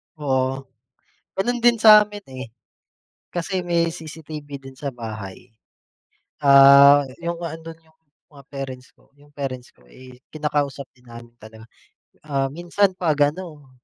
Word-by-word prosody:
Oo. 135 -2 -1 0.7
Gano'n 240 +5 -1
din 235 -1 +3
samin, 210 -2 +6
eh. 130 -1 -7 0.8
Kasi 180 +2 -3
may 170 -1 0
CCTV 155 -2 -9
din 135 0 -13
sa 145 - -4
bahay. 110 -2 -9 0.9
Ah, 140 0 +7 0.2
yung 170 0 -5
ando'n 165 0 -7
yung 160 0 -29 0.3
mga 140 -2 -16
parents 130 -2 -7
ko, - - -29
yung 145 0 -22
parents 130 -3 -6
ko, 65 - -26
eh, 125 - -15
kinakausap 145 -2 -3
din 125 -1 -24
namin 120 0 -13
talaga. 110 +1 -14 0.6
Ah, 135 -2 -1
minsan 175 +5 0
'pag 150 -5 +2
ano, 155 -7 -11
145 Hz, 130 wpm, -22 LUFS, 130-170 Hz, 0.9 s, Ah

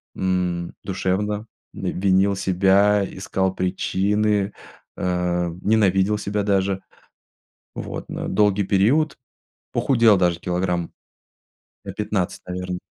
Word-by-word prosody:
м, 90 -2 -1
душевно, 100 +3 -1 0.3
в - - -15
винил 95 +1 +2
себя, 95 +2 +3
искал 95 0 -2
причины, 100 +2 0 0.5
э, 90 -1 0
ненавидел 105 -1 +3
себя 105 0 -2
даже, 95 -1 +1 0.9
вот, - - -6
на - - -4
долгий 105 -1 +2
период. 120 +11 +2 0.5
Похудел 115 -6 +4
даже 90 -2 +1
килограмм 90 -1 -1 0.9
на - - -6
15, 105 -4 -2
наверно. 90 0 -4
95 Hz, 95 wpm, -22 LUFS, 90-105 Hz, 0.9 s, Похудел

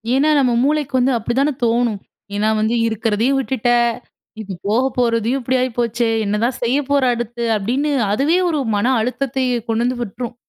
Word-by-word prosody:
ஏன்னா, 295 +3 +3
நம்ம 250 -3 +2
மூளைக்கு 290 -1 0
வந்து 260 +2 +2
அப்படித்தான 260 +6 0
தோணும். 230 -3 +1 0.4
ஏன்னா 210 +1 +1
வந்து, 220 +2 +1
"இருக்கிறதையும் 225 +4 0
விட்டுட்ட 260 -3 -1 0.7
ம், - - -5
ம். - - -8
போக 225 +5 +2 0.2
போறதையும் 235 +1 +1
இப்படி 260 +2 -1
ஆயி 255 - 0
போச்சே! 235 0 0 0.2
என்னதான் 220 +5 0
செய்ய 245 +4 +2
போற 280 -2 +2
அடுத்து?" 240 0 -4
அப்படீன்னு 255 +9 -1 0.2
அதுவே 285 - +2
ஒரு 305 -3 0 0.2
மன 205 - 0 0.2
அழுத்தத்தையே 255 0 -1
கொண்டு 225 +1 +1
வந்து 250 0 -1
விட்டுரும். 235 +2 -5
240 Hz, 165 wpm, -19 LUFS, 225-265 Hz, 0.7 s, ஏன்னா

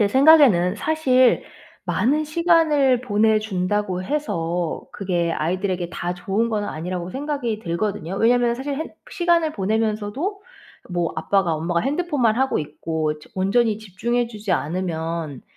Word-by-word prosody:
제 205 - +4
생각에는 260 - +6
사실 260 -2 +3 0.4
많은 300 +5 +1
시간을 305 -5 +3
보내준다고 210 -4 0
해서 175 - -2
그게 175 -4 -1
아이들에게 180 +2 -2
다 175 0 -3
좋은 205 +6 -1
건 210 -2 -1
아니라고 175 +2 -4
생각이 265 -4 -3
들거든요. 190 -1 -3
왜냐면 240 +2 +3
사실 275 +3 -4
핸 315 +3 -5 0.2
'시간을 340 -5 +2
보내면서도 220 - -2 0.5
뭐 175 -1 -1
아빠가 175 +1 +1
엄마가 170 +2 -1
핸드폰만 280 -5 +1
하고 265 +1 +1
있고 155 +1 -2 0.2
온전히 210 +3 +1
집중해 230 +4 -2
주지 215 -3 -7
않으면 165 -2 -3
210 Hz, 310 characters per minute, -22 LUFS, 175-265 Hz, 0.5 s, 생각에는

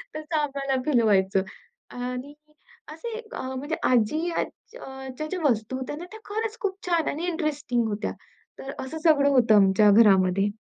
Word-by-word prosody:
तसं 310 +1 -4
आम्हाला 275 -2 -1
फील 260 -6 +3
व्हायचं 195 -3 +3 0.5
आणि 250 +3 -5 0.6
असे 395 +9 -7 0.2
अ, - - -4
म्हणजे 290 +5 -3
आजीच्या 310 +9 +1 0.4
अ, 265 0 -8
ज्या 310 - -3
ज्या 365 +3 -4
वस्तू 225 +2 -1
होत्या 260 +3 -5
ना, 335 - -8
त्या 440 - -10
खरंच 440 +2 -3
खूप 390 -2 -2
छान 335 -3 +1
आणि 320 +4 -3
इंटरेस्टिंग 295 -9 -1
होत्या. 210 0 -3 0.5
तर 270 - -6
असं 265 +4 -5
सगळं 285 -4 +5
होतं 240 -5 +4
आमच्या 200 +1 +5
घरामध्ये. 195 -2 +5
265 Hz, 160 wpm, -25 LUFS, 220-315 Hz, 0.6 s, सगळं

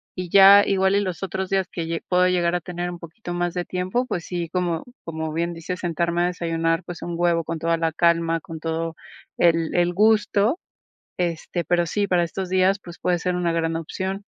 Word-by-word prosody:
y 185 -1 -5
ya 200 +2 +8
igual 190 0 +2
y 200 - +3
los 185 -2 -4
otros 190 0 -3
días 190 -2 +1
que 170 - -4
lle 165 0 -3
puedo 180 0 +3
llegar 175 -1 +1
a 175 - -1
tener 175 0 -4
un 175 -1 -7
poquito 175 +2 -8
más 175 0 -1
de 180 -1 -3
tiempo, 185 +8 -1
pues 175 -8 -4
sí, 175 -2 -4
como 175 -2 -1 0.2
como 160 -1 -4
bien 170 +2 -1
dices, 170 +2 -5
sentarme 170 0 0
a - - +3
desayunar, 165 -1 -1
pues 175 0 -8
un 175 - -4
huevo 170 -1 +2
con 165 +1 -4
toda 165 +1 +1
la 165 0 0
calma, 165 0 +2
con 165 -4 -8
todo 165 +1 -3 0.4
el 165 -1 +2
el 175 0 +2
gusto. 210 - +3 0.6
Este, 175 0 -2
pero 175 -1 +1
sí, 200 +3 -1
para 175 -2 +3
estos 185 +2 -5
días, 190 +2 +2
pues, 175 0 -11
puede 175 -1 0
ser 180 +1 -1
una 175 -1 0
gran 165 0 0
opción. 190 +4 -4
175 Hz, 215 wpm, -23 LUFS, 165-185 Hz, 0.6 s, ya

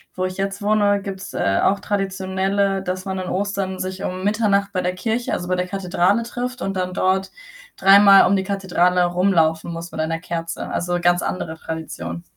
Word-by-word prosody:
wo 185 - -2
ich 185 0 -3
jetzt 195 +1 -3
wohne, 205 -1 +2
gibt's, 195 0 -7
äh, 100 0 +1
auch 200 +1 +2
traditionelle 195 0 -1
dass 185 0 -4
man 190 -1 -4
an 185 - -5
Ostern 195 -1 -2
sich 185 0 -4
um 185 0 -4
Mitternacht 205 -1 +1
bei 185 - -1
der 180 0 -1
Kirche, 225 +5 -2
also 180 - -3
bei 185 - +2
der 180 0 -1
Kathedrale 190 +2 +1
trifft 250 +2 -5
und 195 - -2
dann 185 0 -2
dort 190 +1 0 0.4
dreimal 195 0 +7
um 200 - +3
die 190 - -1
Kathedrale 180 -2 +1
rumlaufen 175 -2 +1
muss 170 +1 -7
mit - - -7
einer 165 +1 -1
Kerze. 165 -1 -4
Also 175 0 -2
ganz 175 0 +3
andere 160 -3 -4
Tradition. 90 - -6
190 Hz, 190 wpm, -21 LUFS, 180-200 Hz, 0.4 s, dreimal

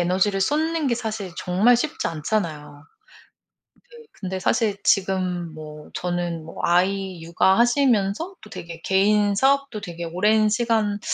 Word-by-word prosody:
에너지를 190 +3 +1
쏟는 310 +6 0
게 235 - +2
사실 215 -6 -5
정말 200 +7 +3
쉽지 300 +6 -2
않잖아요. 155 -4 -3 1.1
네. 470 -1 -14
근데 190 -1 -5
사실 205 +2 +1
지금 185 -3 0
뭐 150 -1 -10
저는 175 -2 -3
뭐 165 - -11
아이 185 0 +1
육아하시면서 235 - +2
또 215 - -13
되게 170 -5 -8
개인사업도 210 +6 +2
되게 175 -3 -7
오랜 210 +6 +2
시간 220 -2 0
195 Hz, 270 characters per minute, -23 LUFS, 175-225 Hz, 1.1 s, 정말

